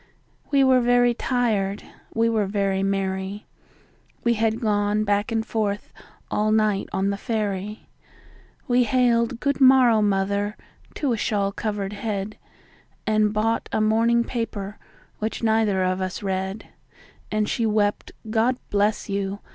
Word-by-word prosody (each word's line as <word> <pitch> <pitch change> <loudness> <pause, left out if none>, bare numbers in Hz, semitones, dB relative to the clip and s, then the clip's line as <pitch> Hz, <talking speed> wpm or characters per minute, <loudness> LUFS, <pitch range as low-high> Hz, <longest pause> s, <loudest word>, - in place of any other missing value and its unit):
We 280 -2 +4
were 260 -1 +5
very 245 0 +4
tired, 220 -6 -1 0.3
we 225 +1 +1
were 220 -3 +1
very 195 -1 0
merry, 195 +1 -2 0.8
We 235 - +3
had 225 0 0
gone 210 -2 +1
back 205 +2 0
and 225 -1 0
forth 210 -3 -2 0.4
all 215 +1 +1
night 215 -2 +1
on 195 +1 0
the 200 - -3
ferry, 210 -1 -3 0.8
We 245 -1 +3
hailed 235 0 +2
"Good 280 +1 -1
morrow, 255 -4 +6
mother!" 200 +1 0 0.4
to 275 -5 0
a - - -1
shawl 200 -2 0
covered 205 -1 -3
head, 205 0 -4 0.7
And 215 -1 +2
bought 220 +2 0
a - - 0
morning 230 +2 +3
paper, 210 -4 -4 0.4
which 220 +2 -3
neither 220 -4 +2
of 185 0 0
us 185 +2 -4
read; 190 +1 -3 0.6
And 215 0 0
she 230 0 0
wept, 210 -1 0 0.2
"God 230 +3 +1
bless 205 +1 +1
you!" 200 0 -2
215 Hz, 140 wpm, -24 LUFS, 200-230 Hz, 0.8 s, morrow